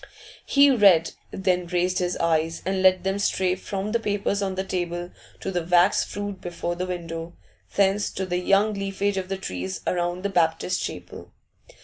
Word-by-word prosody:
He 280 0 +6
read, 195 -9 +5 0.2
then 180 -2 0
raised 180 +1 0
his 180 -1 -1
eyes 165 0 0
and 190 0 0
let 185 -1 +4
them 195 +1 -1
stray 185 -2 +1
from 195 +2 -4
the 235 - +1
papers 205 -1 -1
on 190 -1 -1
the 190 - -1
table 175 -1 -3 0.3
to 195 - -3
the 175 -2 -1
wax 175 +3 +4
fruit 205 -1 -5
before 175 0 -3
the 180 +1 -3
window, 165 -1 -5 0.4
thence 200 +1 +2
to 190 - -2
the 180 -1 -1
young 200 +4 +3
leafage 195 0 -2
of 185 -1 -3
the 195 - -2
trees 95 - -5
around 175 +1 -1
the 200 - 0
Baptist 170 -1 +1
Chapel. - - -7
185 Hz, 175 wpm, -25 LUFS, 175-195 Hz, 0.4 s, He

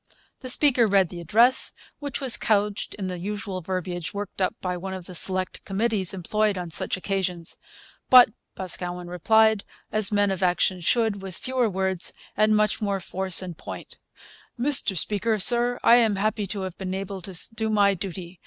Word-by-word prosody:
The 255 - -6
speaker 250 -3 +4
read 195 -3 +3
the 175 - -8
address, 230 +9 +4 0.3
which 285 -3 -4
was 265 -4 +5
couched 205 -1 0
in 200 - -5
the 180 -1 -5
usual 200 0 -5
verbiage 180 0 -4
worked 200 -1 -6
up 185 - 0
by 180 -1 -3
one 190 +2 -6
of 185 -2 -8
the 180 - -9
select 185 +1 0
committees 205 -2 -1
employed 205 +2 -1
on 175 -2 -6
such - - 0
occasions. 185 -3 -2 0.5
But 250 -2 +8 0.3
Boscawen 180 -1 -5
replied, 220 +4 +3 0.3
as 215 -1 +1
men 205 -1 +2
of 190 -1 -4
action 180 0 +1
should, 220 +2 +1
with 190 -2 -6
fewer 255 -3 -1
words 190 -2 -1 0.2
and 215 +1 +3
much 215 0 +1
more 200 -2 -1
force 185 0 +1
and 180 -2 -7
point: - - -10 0.6
'Mr 255 -7 +4
Speaker, 215 +6 0
Sir, 240 +4 +2
I 235 - +7
am 225 -4 +2
happy 210 +1 -1
to 200 +1 -4
have 185 -2 -6
been 190 -1 -4
able 195 0 -6
to 185 0 -6 0.2
do 220 0 -2
my 205 -2 +3
duty. 185 -1 -7
195 Hz, 180 wpm, -24 LUFS, 185-215 Hz, 0.6 s, But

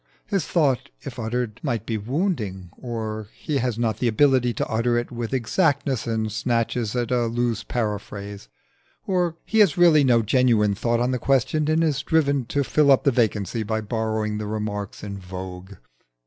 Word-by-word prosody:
His 195 -4 -1
thought, 140 -8 +1
if - - -8
uttered, 115 0 -3
might 120 -7 -2
be 115 - -2
wounding; 110 - -2
or 110 -3 -5
he 145 -3 -2
has 125 -2 -1
not 115 -3 0
the 125 - 0
ability 125 +1 +3
to - - -2
utter 120 +2 +1
it 120 +1 -3
with 120 -2 -4
exactness 135 - 0
and 110 -1 -1
snatches 115 0 -1
at 120 0 -1
a 120 -2 +2
loose 115 -1 -1
paraphrase; 105 - -4 0.6
or 180 -3 0
he 220 - +1
has 195 -8 +5
really 165 -4 +6
no 120 -3 +4
genuine 110 -3 +3
thought 115 +3 0
on 125 +2 +1
the 125 - -1
question 135 +4 +1
and 160 +1 +3
is 145 -4 +1
driven 140 -5 +1
to 140 +2 0
fill 145 +2 +2
up 135 - +5
the 140 - +4
vacancy 115 -2 0
by 110 +1 -1
borrowing 110 -1 -2
the 105 - -4
remarks 105 -1 -4
in 100 -1 -6
vogue. 90 +1 -8
120 Hz, 175 wpm, -23 LUFS, 110-135 Hz, 0.6 s, really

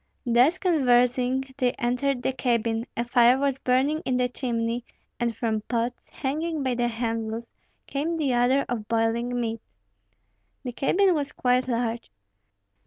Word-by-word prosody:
Thus 250 +8 +4
conversing, 250 -5 +2 0.2
they 250 -2 +2
entered 250 +2 -1
the 265 - 0
cabin; 235 -2 0
a 235 - +1
fire 240 +1 +4
was 275 -1 0
burning 270 +5 +1
in 255 -1 0
the 250 0 +2
chimney, 235 -2 -2 0.4
and 235 -2 -1
from 220 -1 -1
pots, 235 +2 -2
hanging 310 +2 -3
by 260 -1 0
the 240 0 0
handles, 225 -1 -3 0.4
came 315 +4 -2
the 285 -5 0
odor 250 +3 +3
of 225 -3 -4
boiling 230 +2 0
meat. 230 -1 -3 1.0
The 250 - -4
cabin 365 +10 +2
was 290 -3 -2
quite 250 0 +1
large. 235 -1 -2
245 Hz, 145 wpm, -25 LUFS, 235-265 Hz, 1.0 s, Thus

